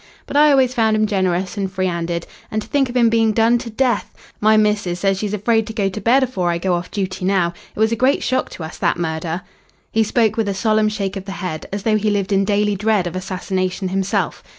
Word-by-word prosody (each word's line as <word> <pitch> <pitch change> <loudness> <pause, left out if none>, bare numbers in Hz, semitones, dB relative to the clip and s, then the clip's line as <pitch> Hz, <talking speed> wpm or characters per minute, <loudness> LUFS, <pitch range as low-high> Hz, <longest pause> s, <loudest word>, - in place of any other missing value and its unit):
But - - -8
I 300 +1 +6
always 265 -3 +4
found 220 -3 +2
'im 215 0 +2
generous 185 -2 -1
and 195 -2 -2
free 185 0 -1
'anded. 170 -1 -2 0.2
And 215 - -1
to - - -14
think 275 -3 +1
of 245 - -2
'im 235 -1 +5
being 225 -1 +3
done 230 +2 +3
to 235 -1 -7
death! 240 -1 0 0.3
My 215 +1 +4
missus 210 -4 +1
says 195 0 +1
she's 210 0 -2
afraid 225 +1 +1
to 220 - -6
go 200 -3 0
to 210 +3 -6
bed 260 +4 +4
afore 190 -9 -1
I 170 - 0
go 180 +1 0
off 175 +1 -2
duty 190 -2 -3
now. 180 -3 +1 0.2
It - - -9
was 220 +1 +3
a - - +2
great 265 +2 +3
shock 255 +1 0
to 165 - -7
us, 160 - -8
that - - +1
murder." 165 +1 -3 0.5
He 225 - +2
spoke 220 0 +1
with 220 -3 0
a 195 - -2
solemn 215 +1 +2
shake 200 -2 -3
of 190 - -7
the 195 - -6
head, 180 -5 -5
as 200 0 -4
though 215 -1 +2
he 215 0 0
lived 205 -1 -1
in 195 0 +3
daily 205 0 +1
dread 210 -1 +1
of 175 0 -4
assassination 185 0 -2
himself. 195 +1 -1
205 Hz, 250 wpm, -19 LUFS, 185-220 Hz, 0.5 s, I